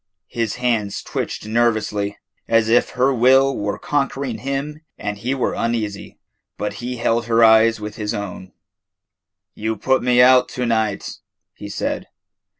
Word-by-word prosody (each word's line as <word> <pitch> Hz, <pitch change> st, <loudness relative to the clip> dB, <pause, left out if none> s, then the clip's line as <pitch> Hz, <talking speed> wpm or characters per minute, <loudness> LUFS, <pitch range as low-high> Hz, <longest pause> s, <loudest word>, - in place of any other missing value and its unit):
His 115 Hz, -3 st, -1 dB
hands 115 Hz, -5 st, -1 dB
twitched -, -, -4 dB
nervously, 110 Hz, -3 st, 0 dB, 0.3 s
as 115 Hz, -1 st, +2 dB
if 120 Hz, -, +3 dB
her 130 Hz, +2 st, +3 dB
will 130 Hz, +3 st, +4 dB
were 105 Hz, 0 st, -3 dB
conquering 140 Hz, -4 st, -2 dB
him 140 Hz, +4 st, -4 dB, 0.2 s
and 105 Hz, -, -4 dB
he 125 Hz, +5 st, -1 dB
were 130 Hz, -, -1 dB
uneasy, 110 Hz, -4 st, -3 dB, 0.4 s
but 105 Hz, +1 st, -3 dB
he 125 Hz, +1 st, -4 dB
held 115 Hz, 0 st, 0 dB
her 115 Hz, 0 st, +4 dB
eye 110 Hz, 0 st, +6 dB
with 105 Hz, 0 st, -7 dB
his 105 Hz, -1 st, -3 dB
own. 95 Hz, -2 st, -6 dB, 1.0 s
"You 110 Hz, +1 st, -3 dB
put 130 Hz, +3 st, +1 dB
me 125 Hz, 0 st, +2 dB
out 125 Hz, 0 st, +6 dB
to 125 Hz, -, 0 dB
night," 110 Hz, -3 st, -1 dB, 0.3 s
he -, -, -9 dB
said. -, -, -3 dB
115 Hz, 150 wpm, -20 LUFS, 105-125 Hz, 1.0 s, eye